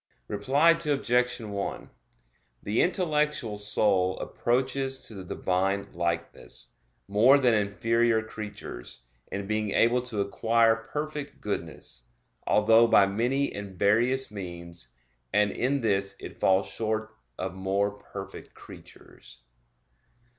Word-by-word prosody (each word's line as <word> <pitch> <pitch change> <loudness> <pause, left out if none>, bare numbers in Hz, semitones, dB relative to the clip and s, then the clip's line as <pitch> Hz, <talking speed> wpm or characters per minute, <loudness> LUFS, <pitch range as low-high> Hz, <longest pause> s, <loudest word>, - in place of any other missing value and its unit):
Reply 135 +11 +3
Obj. 125 -6 +1
1: 100 -2 -5 0.7
The 105 +3 +1
intellectual 150 - 0
soul 100 -3 +2
approaches 130 +2 -1
to - - -7
the 95 -2 -8
Divine 95 +2 -1
likeness, 85 0 -4 0.4
more 110 +8 +6
than 125 -4 +3
inferior 110 +2 +2
creatures, 105 - -8 0.3
in 100 0 -3
being 110 0 -1
able 120 +5 +3
to 120 -4 -4
acquire 115 +3 +3
perfect 150 +6 -6
goodness; - - -5 0.4
although 115 +2 +5
by 100 -3 +6
many 120 +8 0
and 100 -2 -7
various 120 +6 +2
means; 85 -8 -7 0.4
and 105 -1 +3
in 135 +3 0
this 100 -3 0
it - - -10
falls 95 0 +3
short 110 0 -3 0.2
of 95 0 -4
more 95 +2 0
perfect 100 -1 -10
creatures. - - -15
110 Hz, 110 wpm, -27 LUFS, 100-125 Hz, 0.7 s, more